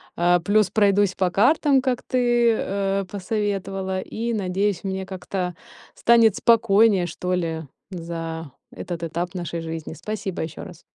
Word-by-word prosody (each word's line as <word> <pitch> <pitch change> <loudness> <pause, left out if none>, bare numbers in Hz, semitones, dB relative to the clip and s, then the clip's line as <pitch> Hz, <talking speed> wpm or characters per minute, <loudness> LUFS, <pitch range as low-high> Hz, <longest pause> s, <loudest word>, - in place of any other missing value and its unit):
А, 175 +1 +3
плюс 205 +3 +2
пройдусь 205 -1 +3
по 185 -2 0
картам, 275 - +3
как 255 -2 -1
ты, 240 -2 +2
э, 195 0 -1
посоветовала, 195 -2 -2
и, 230 +4 -4
надеюсь, 195 -2 -1
мне 190 -1 -3
как-то 180 -1 -4 0.4
станет 230 -3 +5
спокойнее, 220 -5 +4
что 180 +2 -3
ли, 165 -3 -2 0.3
за 165 -3 -6 0.2
этот 175 -2 -6
этап 170 +2 -3
нашей 175 -2 -4
жизни. 160 -1 -6
Спасибо 190 +2 -4
еще 160 - -7
раз. - - -11
190 Hz, 135 wpm, -23 LUFS, 175-215 Hz, 0.4 s, станет